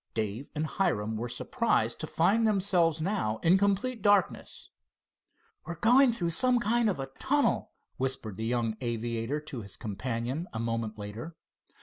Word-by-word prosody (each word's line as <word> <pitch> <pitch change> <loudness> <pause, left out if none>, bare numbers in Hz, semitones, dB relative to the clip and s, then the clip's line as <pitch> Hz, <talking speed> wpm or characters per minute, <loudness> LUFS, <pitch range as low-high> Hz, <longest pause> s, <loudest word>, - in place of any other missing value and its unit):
Dave 110 +4 -3
and 155 +1 -1
Hiram 110 - 0
were 120 +3 -3
surprised 120 - 0
to 155 - -4
find 200 +9 +3
themselves 185 -6 +2
now 160 - -1
in 170 +3 +6
complete 200 +5 0
darkness. 205 -3 +1 1.0
"We're 170 - -4
going 245 +8 +5
through 175 -7 -2
some 250 +8 +3
kind 235 0 +2
of 185 - -2
a 135 0 -5
tunnel," 285 +2 +1 0.3
whispered 130 -6 -3
the 110 - -4
young 115 -2 0
aviator 120 +3 -2
to 145 -5 -7
his 100 -2 -7
companion 120 - -3
a 110 - -3
moment 115 -1 -2
later. 110 +10 -7
150 Hz, 150 wpm, -29 LUFS, -, 1.0 s, in